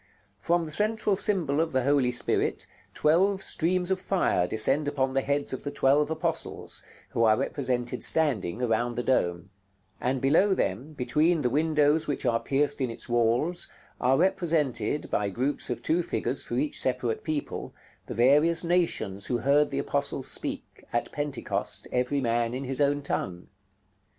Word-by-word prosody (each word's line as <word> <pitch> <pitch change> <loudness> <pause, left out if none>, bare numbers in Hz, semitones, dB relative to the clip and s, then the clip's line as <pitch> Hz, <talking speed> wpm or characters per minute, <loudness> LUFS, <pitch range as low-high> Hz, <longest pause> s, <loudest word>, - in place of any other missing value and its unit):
From 170 - +1
the 155 - -8
central 210 +3 0
symbol 170 -8 +2
of 165 -2 -2
the 130 -1 +1
Holy 140 -2 +2
Spirit 125 - 0 0.3
twelve 190 +5 +2
streams 180 +2 +1
of 190 -1 0
fire 175 - +1
descend 135 +9 +1
upon 135 -2 0
the 135 - +2
heads 140 +1 -1
of 130 - -5
the 145 - -3
twelve 145 +1 +2
apostles, 160 0 -3 0.3
who 115 - 0
are 110 -1 +4
represented 125 -3 -2
standing 125 - +1
around 120 +1 0
the 125 - -2
dome; 90 -7 0 0.5
and 130 +1 -1
below 190 +10 +3
them, 120 - -2
between 150 +4 +1
the 125 - +1
windows 150 +1 +2
which 145 - -2
are 115 -2 +2
pierced 145 +2 0
in 130 - 0
its 115 - -5
walls, 120 +9 +1 0.3
are 130 +2 +3
represented, 150 - 0
by 105 -1 0
groups 130 +10 -2
of 120 - -4
two 170 +2 +2
figures 135 -6 0
for 120 - -5
each 145 +4 -1
separate 125 -3 -1
people, 155 -2 -4 0.4
the - - -6
various 150 +9 +4
nations 165 - 0
who 120 - 0
heard 140 +5 +3
the 135 - -4
apostles 140 -1 -1
speak, - - -3
at 120 - -2
Pentecost, 145 -2 -3
every 125 +3 0
man 120 0 0
in 135 - -4
his 135 +1 -1
own 145 0 +1
tongue. 90 -8 -3
140 Hz, 165 wpm, -27 LUFS, 120-155 Hz, 0.5 s, are